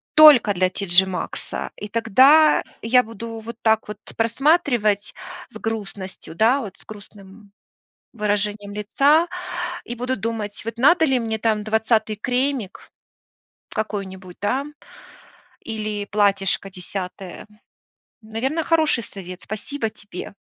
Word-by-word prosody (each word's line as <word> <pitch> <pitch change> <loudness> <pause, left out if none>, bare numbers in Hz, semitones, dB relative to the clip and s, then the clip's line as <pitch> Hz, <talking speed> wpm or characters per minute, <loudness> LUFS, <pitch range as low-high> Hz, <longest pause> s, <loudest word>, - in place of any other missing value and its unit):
только 295 -9 +8
для 185 0 +1
TJ 190 -1 +3
Maxx, 180 -3 -5
и 210 - -8
тогда 265 +8 +5 0.2
я 250 +3 +4
буду 230 0 -8
вот 230 +1 -8
так 220 -1 +2
вот 210 - -6 0.2
просматривать 230 - +2 0.4
с - - -10
грустностью, 200 -6 -6
да, 245 +7 +3
вот, 200 -5 -8
с - - -19
грустным 205 -1 -13 0.6
выражением 205 -1 -2
лица, 280 +10 +3 0.6
и 240 - -5
буду 250 +2 -2
думать, 215 -1 -4
вот, 230 0 -5
надо 320 +7 +5
ли 265 -4 +2
мне, 225 -1 -2
там, 215 -1 0
20 220 0 +1
кремик 250 -2 -2 0.8
какой-нибудь, 190 -4 -5
да, 255 +7 0 1.0
или 215 -2 -4
платьишко 195 -2 +1
10? 185 0 -7 0.8
Наверное, 260 +9 -2
хороший 315 -7 +2
совет. 185 -2 -10
Спасибо 225 +3 -4
тебе. 200 -2 -9
220 Hz, 115 wpm, -22 LUFS, 200-245 Hz, 1.0 s, только